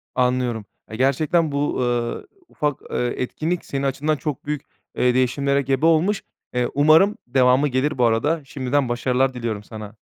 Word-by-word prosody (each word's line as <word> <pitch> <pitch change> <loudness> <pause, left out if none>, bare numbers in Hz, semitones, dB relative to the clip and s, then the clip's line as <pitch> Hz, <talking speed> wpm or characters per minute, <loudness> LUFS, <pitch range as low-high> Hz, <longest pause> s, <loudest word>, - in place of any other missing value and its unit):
Anlıyorum, 125 -3 0 0.2
eee, 110 - -7
gerçekten 150 +5 +2
bu, 140 +1 -1
eee, 120 -1 -1 0.2
ufak, 150 -2 -2
eee, - - -2 0.2
etkinlik 160 +7 -2
senin 135 0 -3
açından 140 +3 0
çok 150 -1 -5
büyük, 150 -2 -2 0.4
eee, 125 0 +3
değişimlere 140 +2 +1
gebe 135 +3 0
olmuş, 170 +6 +3 0.3
eee, 125 -1 +1
umarım 155 +8 +5
devamı 130 +2 +3
gelir, 130 +2 0
bu 125 - +3
arada, 145 +9 +1
şimdiden, 135 -1 -1
başarılar 125 +2 +1
diliyorum 115 -4 -4
sana. 110 0 -9
135 Hz, 155 wpm, -22 LUFS, 125-150 Hz, 0.4 s, umarım